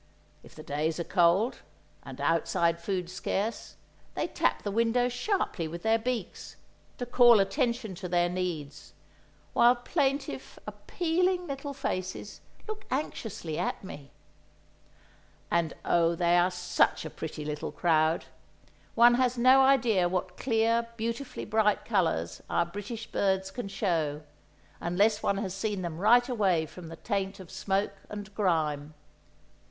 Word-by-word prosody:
If - - -17
the 155 - -10
days 155 +3 -2
are - - 0
cold, 180 +7 +3 0.4
and 135 -1 -10
outside 165 +2 +1
food 180 -1 -2
scarce, 195 +4 -3 0.4
they - - 0
tap - - 0
the 205 - -2
window 230 +3 +2
sharply 245 - -1
with 170 +2 -7
their 225 +1 +3
beaks, 245 +1 -4 0.4
to 245 - -3
call 240 -2 +6
attention 235 +1 0
to 180 0 -7
their 175 0 +2
needs, 175 -5 -4 0.6
while 240 +1 +6
plaintive, 265 - -2
appealing 350 - -1
little 280 -1 -5
faces 205 -7 -4 0.3
look 435 -1 -6
anxiously 225 - -3
at - - -2
me. 145 -7 -9 1.4
And 170 -2 +1
oh, 170 0 +3
they 175 0 +2
are 175 +1 +4
such 180 -2 +1
a - - -4
pretty 155 -1 -6
little 150 0 -4
crowd. 160 -1 +2 0.7
One 240 +1 +7
has 250 -1 +1
no 255 +3 +6
idea 235 -9 +4
what 180 0 -2
clear, 230 0 +1
beautifully 230 +4 -4
bright 215 -1 +1
colour 170 - +1 0.2
our - - +2
British 205 +5 -6
birds 190 -2 0
can 245 0 -5
show, 160 -7 -1 0.6
unless 205 +5 +2
one 200 - +1
has 195 -2 -3
seen 200 -1 -2
them 165 -2 -5
right 240 +5 +5
away 195 -10 +1
from 170 +2 -11
the 165 - -8
taint 195 +1 -3
of 185 -3 -11
smoke 195 +1 -1 0.2
and 205 0 -7
grime. 155 -7 0
195 Hz, 140 wpm, -29 LUFS, 170-235 Hz, 1.4 s, One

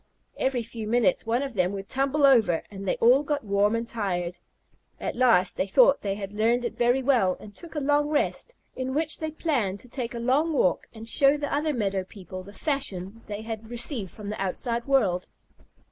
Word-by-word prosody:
Every 260 -3 0
few 225 -1 -7
minutes 225 -2 +2
one 240 +4 +1
of 275 -2 -5
them 185 -2 +1
would 195 0 -6
tumble 275 +4 +2
over, 225 -11 +4
and 195 -1 -7
they - - +2
all 250 +4 +5
got 295 -1 -2
warm 205 +1 +2
and 230 0 -2
tired. 180 -6 -2 0.6
At - - -3
last 235 -7 +3
they 190 - 0
thought 260 +7 +5
they 195 -1 -2
had 200 -1 -6
learned 230 +3 +1
it - - -3
very 245 +2 +2
well, 240 -9 +3
and 205 - -12
took 330 - -10
a - - 0
long 290 +1 +2
rest, 310 +10 0 0.2
in 260 +1 -3
which 315 +1 0
they 315 - -2
planned 260 - -1
to - - -12
take 240 -1 -5
a - - -3
long 275 +7 +2
walk 185 -10 +1
and 225 0 -10
show 275 +4 +5
the 290 -1 -3
other 300 +2 +1
meadow 200 -7 -1
people 185 -1 -9
the 195 +2 -12
fashion 215 - -2
they 210 0 -5
had 225 0 -6
received 240 - -3
from 205 +3 -9
the 210 - -4
outside 235 +5 -2
world. 200 -10 +2
235 Hz, 205 wpm, -26 LUFS, 200-275 Hz, 0.6 s, all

